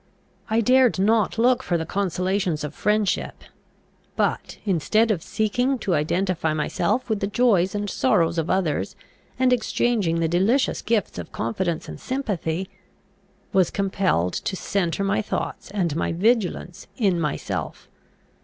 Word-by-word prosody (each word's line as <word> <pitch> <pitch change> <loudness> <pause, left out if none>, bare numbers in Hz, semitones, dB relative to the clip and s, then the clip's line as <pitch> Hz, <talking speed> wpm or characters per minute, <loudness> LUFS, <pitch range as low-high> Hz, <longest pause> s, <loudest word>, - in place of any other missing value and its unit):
I 220 +1 +2
dared 255 0 +4
not 215 +2 +2
look 245 +2 +3
for 175 -9 0
the 160 - -3
consolations 185 -3 -1
of 150 - -4
friendship; 210 -2 0 0.7
but, - - -1
instead 215 +5 +2
of 185 -6 -1
seeking 245 +8 0
to 200 -6 -1
identify 165 +1 0
myself 200 +10 0
with 220 -3 -1
the 200 - -1
joys 210 -5 +2
and 205 0 -2
sorrows 175 -8 +2
of 165 - -2
others, 180 -6 0 0.4
and 255 0 +3
exchanging 225 -8 +1
the 165 - +1
delicious 195 - +2
gifts 220 - -1
of 85 - -8
confidence 165 +8 -2
and - - -8
sympathy, 190 - -2 0.9
was 190 -3 +4
compelled 190 - 0
to 190 - -3
centre 190 -1 -1
my 195 +2 +1
thoughts 210 - -4
and 180 -7 -1
my 165 - -1
vigilance 185 -2 0
in 195 -8 +2
myself. 150 -2 -3
195 Hz, 140 wpm, -23 LUFS, 170-220 Hz, 0.9 s, dared